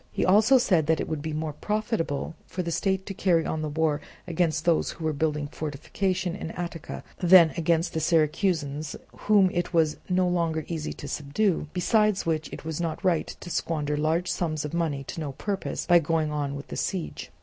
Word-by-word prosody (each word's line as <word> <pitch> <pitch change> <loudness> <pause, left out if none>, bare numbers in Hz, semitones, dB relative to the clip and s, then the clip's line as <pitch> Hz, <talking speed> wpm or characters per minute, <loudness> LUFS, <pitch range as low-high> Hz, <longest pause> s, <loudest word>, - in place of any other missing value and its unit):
He - - 0
also 215 +8 +6
said 180 -11 +2
that 160 0 +3
it - - -2
would 155 -2 -3
be 160 +1 -4
more 155 0 -3
profitable 210 - -2
for 180 - -3
the 170 - -3
state 190 +2 0
to 195 - -5
carry 175 -4 +2
on 160 - -2
the 155 - -2
war 150 -1 0 0.2
against 165 -2 0
those 170 -2 +3
who 165 - -7
were 155 - +1
building 150 0 0
fortifications 180 +5 -2
in - - -4
Attica, 170 -2 -6 0.2
than 175 -2 +7
against 170 0 +1
the 160 - 0
Syracusans 155 -2 +1 0.2
whom 200 -3 +4
it 175 0 -2
was 160 -2 +3
no 180 0 +2
longer 165 -3 0
easy 160 -3 -3
to 145 - -8
subdue; 150 +5 0
besides 210 +3 +2
which 160 -1 -1
it - - -8
was 160 +1 -3
not 165 +1 -3
right 175 -4 +2
to 175 - -8
squander 150 -3 -1
large 160 +4 0
sums 155 -4 -1
of 150 - -6
money 160 -5 -1
to 150 - -7
no 145 -4 -4
purpose 195 +7 -3
by 175 -1 +6
going 160 -1 0
on 145 -2 -2
with 140 - -8
the - - -5
siege. 185 -5 -3
165 Hz, 200 wpm, -26 LUFS, 155-180 Hz, 0.2 s, than